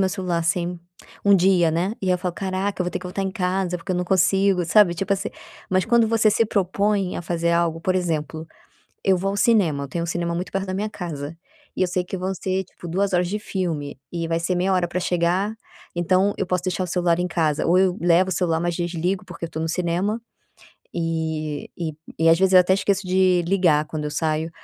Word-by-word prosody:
meu 190 - +3
celular, 180 -2 -2
assim, 175 +1 -1 0.4
um 200 -1 +6
dia, 180 -2 +4
né. 175 +6 0
E 185 -1 0
aí 180 - +3
falo: 180 -1 -3
"Caraca, 190 0 -2
eu - - +2
vou 180 - -2
ter - - -3
que - - -13
voltar 190 +2 -4
em 190 - -1
casa, 180 -1 -1
porque 185 +2 -4
eu - - -1
não 180 - -1
consigo", 190 0 +3
sabe, 180 0 +5
tipo 195 +4 -1
assim. 195 - -1 0.4
Mas 185 0 +2
quando 230 -1 +3
você 225 -1 +3
se 225 +1 +2
propõe 200 -1 0
a - - -3
fazer 170 0 -1
algo, 165 -1 0
por 185 - +1
exemplo, 160 -3 -2 0.6
eu 190 -1 +4
vou 195 +2 -1
ao - - -3
cinema, 190 -10 +2
eu - - -8
tenho 170 +4 -3
um - - -3
cinema 170 0 -2
muito 180 +2 -4
perto 195 0 -2
da 185 - -3
minha 210 +3 -1
casa 165 -6 -6 0.4
e - - +1
eu - - +3
sei 180 0 0
que 190 - -5
vão 185 +1 -2
ser 190 +2 -2
tipo 175 - -12
2 190 +3 0
horas 175 0 +2
de 210 - -2
filme 165 -9 -3
e 170 -1 -3
vai 165 0 -1
ser 180 +2 0
meia 185 +2 +1
hora 180 -1 +2
pra 180 +2 -2
chegar, 180 +5 0 0.4
então 185 +3 +2
eu 195 - -1
posso 180 -1 -1
deixar 185 0 -1
o - - -3
celular 175 -1 +1
em 180 - 0
casa, 155 -4 0
ou 175 +2 +4
eu 190 -1 +3
levo 175 +2 +4
o - - 0
celular, 165 -2 +1
mas 175 0 -1
desligo 175 +3 -2
porque 175 -2 -7
eu 165 - -4
estou 160 - -5
no 165 - -2
cinema. 180 +6 -1 0.8
E 160 -3 -2
e 165 -3 -3 0.3
e 165 0 +4
às 165 - +6
vezes 190 0 +3
eu 185 - +10
até 180 +1 +2
esqueço 195 -1 0
de 185 -1 +3
ligar 170 -5 +3
quando 150 -1 -5
eu 150 - -2
saio, 160 +1 -1
180 Hz, 240 wpm, -23 LUFS, 170-190 Hz, 0.8 s, eu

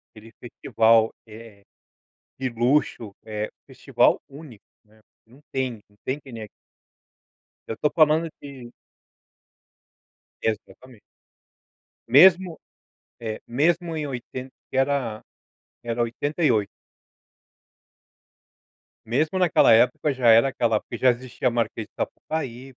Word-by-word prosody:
Aquele 110 +1 -14
festival, 115 -1 +2 0.2
eh, 110 -2 -13 0.8
de 130 - -1
luxo, 120 -2 0
eh, 105 -1 -4 0.2
festival - - +2
único, 140 -7 -13 0.2
né, 110 0 -26
porque 115 - -35
não 140 - -19
tem 130 -2 -1
não 105 - -29
tem 135 +3 -3
que 135 -3 -14
nem 115 - -8
aquele. 105 - -8 1.2
Eu 115 - -4
tô 150 - +1
falando 160 0 +3
de 130 -4 -11 1.7
Exatamente. 115 +1 -5 1.1
Mesmo, 175 +6 +5 0.6
eh, 110 -2 -5
mesmo 165 +6 0
em 150 -2 -3
oitenta 130 0 -7 0.2
que - - -5
era 135 -5 0 0.6
era 120 0 -2
88. 120 - 0 2.4
Mesmo 155 +10 0
naquela 175 -9 +4
época, 125 +6 +3
já 125 -3 +2
era 115 +3 +6
aquela 115 -4 0
porque 120 - -8
já 130 +1 +4
existia 125 +1 -4
a 125 - +2
Marquês 115 -2 -2
de - - -63
Sapucaí. 135 -4 -5
125 Hz, 115 wpm, -24 LUFS, 115-145 Hz, 2.4 s, era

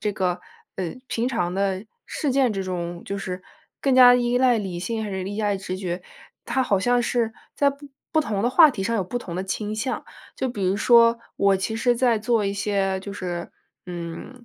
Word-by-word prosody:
这 210 - 0
个， 180 -2 -1 0.4
呃， 180 -3 -3
平 230 +1 -1
常 180 -9 -1
的 195 0 -1 0.2
事 290 - -2
件 260 -2 +3
之 195 -2 -2
中， 175 -2 -4
就 200 - -3
是 185 -2 -5 0.4
更 270 -2 +2
加 250 -1 +9
依 245 0 +1
赖 250 -2 +4
理 190 -4 -4
性 220 +5 -3
还 215 - -4
是 190 -1 -3
依 205 +2 -3
赖 205 -2 +1
直 185 -1 -5
觉， 180 -2 -4 0.4
它 260 - 0
好 200 -5 +2
像 245 +5 +2
是 235 -2 0 0.2
在 285 -1 +4
不 280 +1 -12 0.2
不 315 - +4
同 210 -8 -2
的 240 - +2
话 310 +3 +8
题 210 -7 -4
上 230 +4 -1
有 200 - +1
不 215 +7 -3
同 175 -8 -7
的 185 - -2
倾 210 +2 -3
向。 230 +5 -3 0.3
就 265 - -1
比 210 -5 -5
如 190 +2 +1
说 230 +1 +5 0.2
我 200 -1 +4
其 210 +4 -3
实 240 +1 +2
在 235 -2 +3
做 220 0 +1
一 200 - 0
些 195 -1 0
就 200 +1 -7
是， 175 -3 -5 0.4
嗯 175 +8 -7
210 Hz, 235 characters per minute, -24 LUFS, 190-245 Hz, 0.4 s, 加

